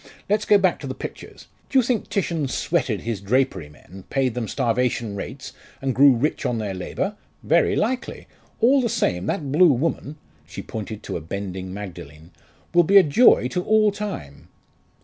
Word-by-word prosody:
Let's 210 +2 +1
go 205 - +6
back 190 -3 +1
to 140 - -7
the 130 - -5
pictures. - - -9 0.2
Do 275 - +1
you 260 - +5
think 235 -2 -1
Titian 170 -7 -1
'sweated' 130 - -1
his 115 -4 -4
drapery 100 - 0
men 90 +6 -14
paid 130 -3 0
them 120 -2 -3
starvation 120 -3 -1
rates, 130 +7 -7 0.3
and 135 -1 -1
grew 135 0 +6
rich 145 +7 -1
on 120 - -1
their 105 -3 -3
labour? 140 - -4 0.3
Very - - +3
likely. 250 +3 -2 0.4
All 265 +4 +5
the 235 - 0
same, 90 - -1
that 140 -4 -2
blue 165 +3 +6
woman" 150 +2 -2 0.3
she 85 - -8
pointed 110 -1 -7
to - - -4
a - - -7
bending 95 +2 -6
Magdalen 85 -5 -9 0.4
"will 175 - +6
be 195 +4 +5
a 195 - +9
joy 150 - +5
to 180 +6 -2
all 215 0 +3
time." 195 - -7
130 Hz, 180 wpm, -23 LUFS, -, 0.4 s, a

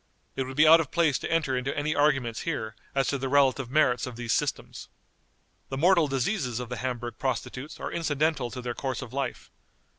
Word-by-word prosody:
It 135 - -1
would 130 +1 -8
be 155 +1 +6
out 165 +1 +9
of 155 -5 -2
place 165 -6 +2
to - - -5
enter 155 -5 +1
into 130 +3 -2
any 150 +1 0
arguments 135 -6 +1
here 110 -10 -3 0.2
as 135 -1 +2
to 140 - -1
the 135 0 -2
relative 135 -2 +3
merits 130 -4 +2
of 125 - -7
these 120 -1 -2
systems. - - -3 0.8
The 135 - -4
mortal 170 +1 +4
diseases 135 - -1
of 125 -2 -6
the 125 - -4
Hamburg 120 -1 -4
prostitutes 130 +2 -4
are - - -4
incidental 155 -5 0
to 125 +1 -7
their 120 -1 -3
course 130 0 -3
of 125 -1 -11
life. 135 -2 -4
135 Hz, 205 wpm, -27 LUFS, 125-150 Hz, 0.8 s, out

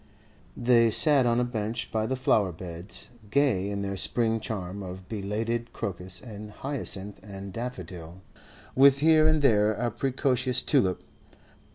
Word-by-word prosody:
They 120 -1 +4
sat 140 +2 +4
on 120 0 +2
a - - +2
bench 115 -1 -3
by 110 0 -1
the 130 - -1
flower 105 -7 +2
beds, 85 +2 -8 0.2
gay 110 -7 +2
in 100 0 -3
their 100 0 -3
spring 115 +2 +2
charm 100 -3 -5
of 90 0 -8
belated 115 +3 -3
crocus 90 -1 -3
and 105 -3 -9
hyacinth 105 -5 -3
and 100 -2 -9
daffodil, 90 -8 -7 0.5
with 135 +1 +6
here 155 +1 +5
and 155 -2 +2
there 105 -4 +4
a 120 +2 -2
precocious 125 0 0
tulip. 120 -11 +1
110 Hz, 145 wpm, -27 LUFS, 100-125 Hz, 0.5 s, with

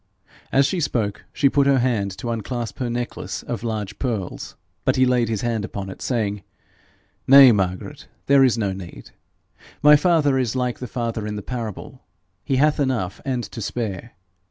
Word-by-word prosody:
As 135 +1 +4
she 185 +5 -1
spoke, 110 -9 -2
she 140 - +2
put 140 0 +2
up 140 - +5
her 135 - +3
hand 115 -6 0
to 120 -3 -4
unclasp 115 0 -4
her 125 -2 -1
necklace 120 +1 -4
of 120 -4 -4
large 110 -3 -4
pearls, 110 -8 -4 0.3
but 130 - +2
he 130 - +4
laid 125 -2 +2
his 110 -3 -2
hand 115 -3 -1
upon 95 -1 -5
it, - - -11
saying, 105 -5 -1 0.9
'Nay, 135 -1 +9
Margaret, 95 -4 -2 0.2
there 140 -1 +5
is 125 -3 +3
no 100 -4 -1
need. 95 -3 -10 0.7
My 150 0 +9
father 150 -4 +3
is 125 -2 -1
like 125 -1 -1
the 125 - -5
father 115 -3 -3
in 105 - -4
the 105 - -6
parable: 115 -5 -6 0.4
he 135 - 0
hath 150 +3 +3
enough 120 -9 -1
and 130 -3 -1
to 115 - -8
spare. 110 0 -4
120 Hz, 180 wpm, -22 LUFS, 105-130 Hz, 0.9 s, Nay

